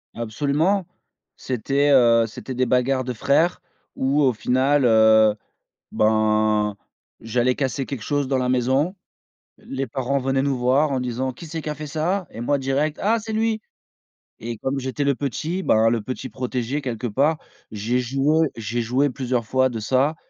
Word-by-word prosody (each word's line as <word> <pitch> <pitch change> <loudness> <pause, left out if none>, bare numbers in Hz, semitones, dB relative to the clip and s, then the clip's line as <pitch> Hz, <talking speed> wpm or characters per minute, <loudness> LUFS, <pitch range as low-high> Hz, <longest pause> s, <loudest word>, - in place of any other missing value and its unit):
Absolument. 145 - 0 0.5
C'était, 135 +4 0
heu, 115 -4 +5
c'était 130 +4 -8
des 130 0 0
bagarres 130 +1 +1
de 125 - -4
frères 160 +10 +1 0.3
où 140 +3 +1
au 130 -2 +4
final, 130 +5 +2
heu, 110 -2 +5 0.6
ben, 110 -1 +2 0.5
j'allais 120 +3 +1
casser 135 0 -2
quelque 135 -4 -6
chose 145 +3 -1
dans 135 -1 0
la 125 0 0
maison. 130 +8 +1 0.6
L - - -21
les 135 0 -2
parents 135 +3 -1
venaient 135 +1 0
nous 140 -2 0
voir 135 +4 +2
en 130 - 0
disant: 125 +1 -2
«Qui 165 - -11
c'est 160 0 -5
qui 150 - -4
a - - -3
fait 150 +1 -7
ça?» 165 +4 -1
et 115 - -9
moi 140 +4 +1
direct 140 +3 -1
«Ah 225 +3 +2
c'est 220 +1 -6
lui!» 220 0 0 0.8
et 115 -1 -5
comme 135 +1 -2
j'étais 130 +2 -3
le 140 -1 +2
petit, 155 - -3
ben, 110 -6 +3
le 115 0 +1
petit 130 +2 -5
protégé 125 +3 -3
quelque 125 -2 -4
part, 145 +8 +1 0.3
j'ai 110 +4 -1
joué 140 +5 +1
j'ai 115 +2 -2
joué 130 +5 +1
plusieurs 125 -3 -2
fois 130 +1 +2
de 115 - -5
ça. 135 +8 +1
130 Hz, 175 wpm, -22 LUFS, 120-145 Hz, 0.8 s, heu